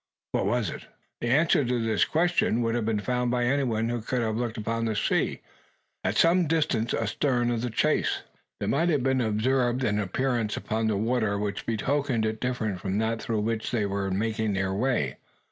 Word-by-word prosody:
What - - 0
was 120 0 0
it? - - -9 0.3
The 120 - -3
answer 145 +4 +4
to 125 -1 0
this 110 -2 +2
interrogatory 175 +2 +2
would 115 0 +1
have 115 -2 -1
been 110 -2 0
found 125 +2 0
by 125 0 +1
anyone 120 -4 +1
who 120 -1 -2
could 120 +2 -1
have 110 -1 -1
looked 120 0 -2
upon 115 +1 -2
the 110 -1 -1
sea, 105 - 0 0.6
at - - 0
some 170 0 +4
distance 150 -8 +1
astern 120 +2 0
of 115 -1 -1
the 125 - -2
chase. 110 - +1 0.4
There - - -2
might 165 +5 +2
have 145 -6 +1
been 130 -1 +2
observed 120 +3 +1
an 105 -3 +1
appearance 115 +2 -1
upon 110 +1 -1
the 105 -2 +1
water, 110 -1 +1
which 100 0 -3
betokened 125 +1 0
it 110 0 -2
different 110 -7 -2
from 95 0 -1
that 110 +1 0
through 110 -2 -1
which 110 +1 -1
they 110 -4 0
were 100 0 -2
making 110 +2 -1
their 95 0 0
way. 100 - 0
115 Hz, 195 wpm, -27 LUFS, 110-125 Hz, 0.6 s, answer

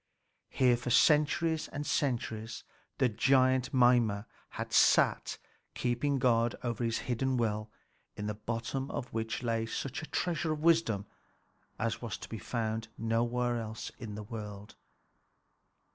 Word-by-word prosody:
Here 125 -2 +3
for 120 - -4
centuries 155 +4 +3
and 145 0 -5
centuries 115 -6 -2 0.3
the 130 - +4
giant 130 +2 +3
Mimer 120 -5 +4 0.3
had - - -4
sat - - +4 0.4
keeping 125 +3 0
guard 120 -2 +2
over 120 0 -2
his 115 -1 0
hidden 130 +1 0
well, 110 -2 -1 0.5
in 105 - -5
the 105 - -1
bottom 115 +5 -3
of 120 - -5
which 115 +2 -2
lay 115 -1 0
such 135 +5 -4
a 155 - -7
treasure 165 -2 -1
of 150 0 -6
wisdom 160 -12 +3 0.7
as 115 0 -2
was 110 -7 -4
to - - -10
be 110 - -5
found 110 +2 -2
nowhere 120 +1 0
else 110 0 -6
in 110 -4 -6
the 105 - -6
world. 105 -2 -8
120 Hz, 140 wpm, -31 LUFS, 110-130 Hz, 0.7 s, the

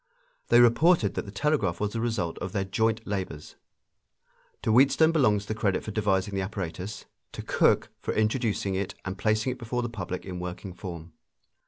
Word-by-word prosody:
They 120 - +6
reported 120 - +4
that - - -3
the - - -7
telegraph 105 - 0
was 105 -1 -1
the 115 - -2
result 110 -8 -2
of 90 - -5
their 100 - 0
joint 110 +3 0
labors. 95 -7 -5 1.1
To - - +1
Wheatstone 140 +7 +5
belongs 105 -10 +2
the 110 - -3
credit 105 -4 0
for 110 - -5
devising 100 -2 0
the 95 - 0
apparatus; 95 0 -5 0.3
to - - -6
Cooke - - +2
for - - -3
introducing 110 -3 0
it 95 0 -2
and 95 - -3
placing 110 +5 +1
it 125 - -7
before 120 +1 -2
the 120 - -2
public 90 -5 -5
in 90 -2 -5
working 90 +1 -6
form. 85 -3 -8
105 Hz, 180 wpm, -27 LUFS, 95-115 Hz, 1.1 s, They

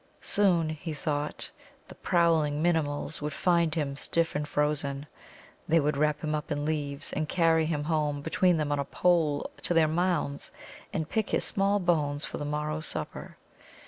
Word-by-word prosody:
Soon, 180 -6 +3
he 155 +1 -5
thought, 150 0 -3 0.4
the - - -10
prowling 165 -4 +2
Minimuls 155 -3 0
would 150 0 -3
find 170 -3 +2
him, 145 -4 -1
stiff 165 +3 0
and 150 0 -2
frozen. 145 -1 -1 0.6
They 165 +1 +4
would 150 -1 +1
wrap 150 +1 +1
him 155 -1 -1
up 150 0 -3
in 145 0 -1
leaves, 145 -2 -2
and 155 0 -2
carry 165 -2 +3
him 150 -3 -1
home 150 -2 0
between 180 +1 +2
them 150 -2 -1
on 145 - +1
a 140 - -1
pole 160 -3 +1
to 175 - 0
their 160 -1 +5
mounds, 165 -3 -1 0.4
and 160 - -2
pick 220 +4 -1
his - - +1
small 200 +1 +2
bones 150 -5 0
for - - -6
the 145 - -3
morrow's 150 +1 -2
supper. - - -5
155 Hz, 175 wpm, -28 LUFS, 145-165 Hz, 0.6 s, their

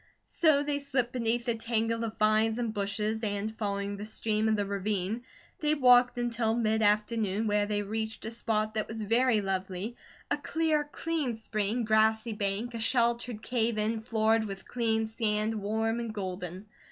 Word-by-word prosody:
So 305 -4 +3
they 290 -1 -1
slipped 255 -4 -1
beneath 235 -1 0
the 235 - +1
tangle 230 0 -1
of 225 -1 -4
vines 215 +1 +3
and 235 -3 -2
bushes, 210 +2 -1
and, 210 +1 -2
following 200 -1 -2
the 205 - -6
stream 220 0 0
of 220 - +3
the 205 -1 0
ravine, 200 +2 -2 0.4
they 300 0 +2
walked 250 -3 +5
until 235 -2 0
mid 220 -2 +1
afternoon, 210 0 +1
when 205 -1 +2
they 205 0 -1
reached 220 +2 -4
a 220 - -3
spot 215 -2 -1
that 215 -1 -1
was 220 -1 -5
very 230 +1 +3
lovely, 190 +3 -3 0.4
a - - +2
clear, 315 -2 0
clean 310 -8 -2
spring, 220 +1 -1
grassy 220 +1 +2
bank, 210 +3 -2
a 230 - -4
sheltered 235 -1 +1
cave 235 -2 0
in 220 +1 0
floored 220 -1 +2
with 195 -2 -7
clean 225 -2 0
sand, 220 -1 0
warm 220 +2 -1
and 230 -2 -4
golden. 185 -1 -5
220 Hz, 170 wpm, -29 LUFS, 210-235 Hz, 0.4 s, walked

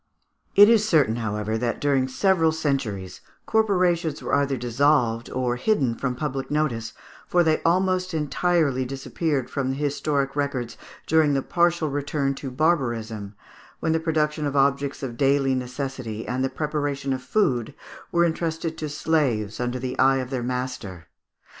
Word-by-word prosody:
] - - -50
It 205 +1 +9
is 225 -2 +5
certain, 140 - +3
however, 110 -1 -2
that 120 0 -1
during 135 -3 +2
several 165 +3 +2
centuries 125 - -2 0.2
corporations 180 -7 +1
were - - -3
either 140 -1 +2
dissolved 120 -1 +1
or 125 -1 -1
hidden 135 - +1
from 125 +1 -3
public 135 0 -3
notice, 130 -7 -1 0.3
for 175 -1 +3
they 160 -1 +2
almost 185 +1 +1
entirely 155 -3 +1
disappeared 135 +1 -2
from 135 -2 -2
the 135 - -1
historic 140 -1 -1
records 140 -5 -2 0.3
during 155 -3 +3
the 135 - 0
partial 170 -2 +1
return 140 0 -1
to 135 0 -6
barbarism, 120 -8 -1 0.4
when 160 - 0
the 160 - +2
production 155 -2 0
of 140 - -3
objects 140 0 +1
of 120 -3 -5
daily 135 0 +2
necessity 125 -3 -4
and 130 +1 -1
the 135 - +1
preparation 145 -1 -2
of 130 - -4
food 130 - 0 0.4
were 170 0 +3
entrusted 165 -1 -2
to 155 - -3
slaves 135 -9 0
under 125 +1 -1
the 130 0 -5
eye 135 +1 +5
of 130 0 -4
their 130 -2 -2
master. 120 -9 -4
140 Hz, 155 wpm, -24 LUFS, 125-160 Hz, 0.4 s, It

